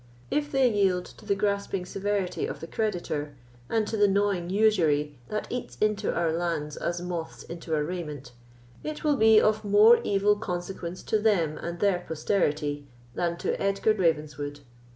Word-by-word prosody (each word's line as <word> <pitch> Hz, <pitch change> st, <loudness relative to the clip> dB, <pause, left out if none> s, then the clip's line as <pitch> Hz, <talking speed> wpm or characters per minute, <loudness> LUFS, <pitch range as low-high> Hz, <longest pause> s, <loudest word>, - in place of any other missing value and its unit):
If 295 Hz, 0 st, 0 dB
they 270 Hz, -2 st, +4 dB
yield 195 Hz, -5 st, +2 dB
to 210 Hz, -, -15 dB
the 200 Hz, -, +2 dB
grasping 200 Hz, -2 st, -1 dB
severity 195 Hz, -1 st, -2 dB
of -, -, -6 dB
the -, -, -6 dB
creditor, 165 Hz, -8 st, -3 dB, 0.3 s
and 220 Hz, -1 st, +1 dB
to 220 Hz, -, -3 dB
the 205 Hz, -1 st, +4 dB
gnawing 195 Hz, -3 st, +1 dB
usury 160 Hz, -, +2 dB
that 215 Hz, -, -2 dB
eats 250 Hz, 0 st, -5 dB
into 210 Hz, -1 st, +1 dB
our 170 Hz, -2 st, 0 dB
lands 165 Hz, -3 st, -2 dB
as 175 Hz, 0 st, -2 dB
moths 175 Hz, -2 st, -5 dB
into 170 Hz, -1 st, -4 dB
a 150 Hz, -, +1 dB
raiment, 150 Hz, -5 st, -5 dB, 0.5 s
it 305 Hz, 0 st, -5 dB
will 300 Hz, -2 st, +3 dB
be 220 Hz, -3 st, +6 dB
of 215 Hz, 0 st, +2 dB
more 210 Hz, +3 st, +6 dB
evil 205 Hz, +1 st, +3 dB
consequence 180 Hz, -3 st, -5 dB
to 215 Hz, -, +1 dB
them 185 Hz, -8 st, +2 dB
and 170 Hz, 0 st, -5 dB
their 200 Hz, -3 st, +3 dB
posterity 150 Hz, -4 st, -1 dB, 0.3 s
than 170 Hz, +3 st, -1 dB
to -, -, -1 dB
Edgar 195 Hz, +2 st, +2 dB
Ravenswood. 150 Hz, -6 st, -1 dB
185 Hz, 165 wpm, -27 LUFS, 165-210 Hz, 0.5 s, be